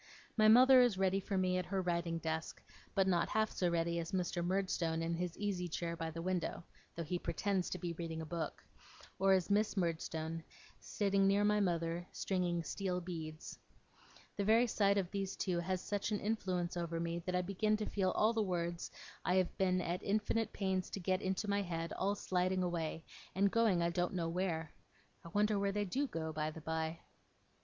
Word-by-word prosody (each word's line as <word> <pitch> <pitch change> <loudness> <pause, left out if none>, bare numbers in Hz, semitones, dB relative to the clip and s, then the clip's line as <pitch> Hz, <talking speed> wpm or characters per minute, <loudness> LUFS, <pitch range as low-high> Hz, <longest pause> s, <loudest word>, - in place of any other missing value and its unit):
My 215 -1 +5
mother 255 +3 +8
is 240 -6 +3
ready 190 0 +2
for 195 0 -2
me 185 -1 +2
at 180 - -4
her 195 0 -1
writing 170 -2 0
desk, 160 0 -3 0.4
but 195 - +4
not 175 -3 +2
half 220 0 +1
so 180 - 0
ready 170 0 0
as 165 +2 -5
Mr. 175 -2 0
Murdstone 175 -3 0
in 165 +1 -1
his 170 0 -3
easy 195 -4 -1
chair 170 0 -3
by 165 -1 -3
the 165 +1 -6
window 180 -2 -2 0.3
(though 170 - -3
he 175 +3 -2
pretends 185 +3 -1
to - - -3
be 175 -1 -3
reading 165 -1 -5
a 160 - -4
book), 160 -1 -4 0.6
or 195 0 +5
as 190 +1 +1
Miss 210 +1 +2
Murdstone, 165 -2 -2 0.4
sitting 200 -1 +1
near 200 +1 +4
my 210 0 +3
mother 170 -2 0
stringing 175 -3 0
steel 185 0 -2
beads. 160 -3 -7 0.8
The 200 - +1
very 225 +4 +5
sight 200 -3 +2
of 185 -3 -1
these 195 -1 -2
two 180 -3 -1
has 185 +1 -1
such 205 +1 -2
an 210 - 0
influence 185 -5 -1
over 170 -1 -2
me, 170 0 -2
that 180 - 0
I 180 - +2
begin 210 +3 +1
to 215 - -2
feel 200 +3 +2
the 225 - +1
words 175 -3 -2 0.3
I 180 - +2
have 185 -2 +2
been 185 -1 +3
at 175 +2 -2
infinite 215 +2 0
pains 190 -2 -1
to - - -5
get 185 +1 0
into 190 +3 -1
my 200 0 +1
head, 165 -3 -3
all 200 +2 0
sliding 185 -1 0
away, 165 -2 -2 0.3
and 200 +1 +3
going 220 -7 +3
I 170 - +1
don't 175 +2 -1
know 165 -2 -1
where. 165 -3 -2 0.5
I - - -9
wonder 205 +3 +2
where 200 0 +1
they 205 +1 -1
do 275 +9 0
go, 160 -7 -4
by 155 0 -1
the 160 +1 -9
by? 160 +1 -2
180 Hz, 200 wpm, -36 LUFS, 170-200 Hz, 0.8 s, mother